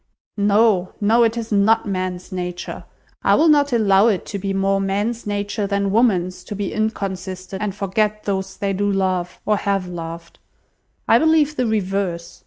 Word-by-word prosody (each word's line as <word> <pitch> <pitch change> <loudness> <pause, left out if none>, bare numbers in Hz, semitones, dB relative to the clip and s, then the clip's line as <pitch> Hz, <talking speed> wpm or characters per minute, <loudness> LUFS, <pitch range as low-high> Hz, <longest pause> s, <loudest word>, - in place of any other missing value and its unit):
"No, 205 -2 +3
no, 220 +3 +3
it 230 0 +2
is 230 -1 -5
not 210 +2 +3
man's 185 -1 -3
nature. 180 -1 -5 0.4
I - - +4
will 325 - +4
not 290 -2 +4
allow 210 -3 +4
it 205 -5 0
to 200 - -2
be 195 +1 -3
more 195 0 +1
man's 205 +4 -2
nature 205 0 -2
than 200 -1 0
woman's 185 -5 +1
to 205 - -6
be 200 -1 -3
inconstant 190 -3 -4
and 205 -2 -2
forget 210 +2 -1
those 190 -1 -3
they 200 -1 -1
do 205 +1 0
love, 185 -2 -1
or 210 -1 +2
have 195 -2 -1
loved. 170 -1 -8 0.7
I - - +5
believe 315 -2 +3
the 255 -3 0
reverse. 195 -5 -2
200 Hz, 170 wpm, -20 LUFS, 185-215 Hz, 0.7 s, I